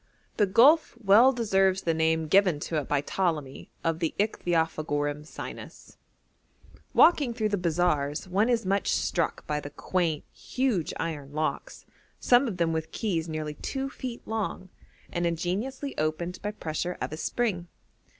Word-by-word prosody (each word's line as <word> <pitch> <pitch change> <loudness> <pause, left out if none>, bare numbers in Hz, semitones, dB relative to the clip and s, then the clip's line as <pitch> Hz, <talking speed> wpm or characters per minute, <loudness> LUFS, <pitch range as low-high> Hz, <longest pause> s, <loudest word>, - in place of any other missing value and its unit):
The 205 - +3
gulf 270 - +5
well 215 +7 +7
deserves 195 -6 +2
the 165 - +1
name 160 0 +1
given 180 -2 +4
to 160 - -2
it 145 - -2
by 145 -1 +1
Ptolemy 150 -5 -2
of 165 -1 0
the 165 -2 -1
Ichthyophagorum 155 -6 -1
sinus. - - -9 1.0
Walking 285 -8 +5
through 215 -3 0
the 205 - 0
bazaars 165 -3 0
one 200 +6 +2
is 235 -4 +1
much 195 +1 +1
struck 170 - -1
by 150 -1 -1
the 145 - -7
quaint, 165 0 -1
huge 250 - -1
iron 145 -4 -4
locks, 155 - -3 0.3
some 250 +2 +4
of 200 -6 -4
them 165 -2 +1
with 160 0 -3
keys 170 -7 -2
nearly 155 -1 -3
two 270 - -4
feet 250 -4 -6
long, 215 -4 -3 0.4
and 175 0 0
ingeniously 205 - -3
opened 155 +4 -2
by 205 - -2
pressure 175 -3 -4
of - - -4
a - - -2
spring. 190 -4 -1
175 Hz, 150 wpm, -27 LUFS, 155-215 Hz, 1.0 s, well